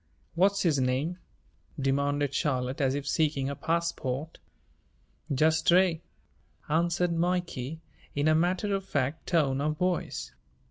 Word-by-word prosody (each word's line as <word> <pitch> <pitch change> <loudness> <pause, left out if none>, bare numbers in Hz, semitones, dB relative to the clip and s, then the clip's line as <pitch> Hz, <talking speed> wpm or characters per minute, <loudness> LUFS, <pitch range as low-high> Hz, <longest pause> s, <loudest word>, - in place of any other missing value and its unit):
"What's 195 +3 +3
his 155 -6 +2
name?" 135 +8 0 0.6
demanded 140 +1 0
Charlotte 130 -1 -1
as 135 0 +2
if 145 0 -4
seeking 145 -3 +1
a - - -4
passport. 160 -3 -2 0.9
"Just 155 +3 +3
Stray," 175 0 +3 0.7
answered 170 +2 +1
Mikey 165 -4 -2 0.3
in 145 +1 +1
a 155 - +5
matter 180 +5 +1
of 195 0 -1
fact 145 -3 -2
tone 140 -6 +2
of 150 +1 -1
voice. 180 0 -2
155 Hz, 125 wpm, -28 LUFS, 140-175 Hz, 0.9 s, a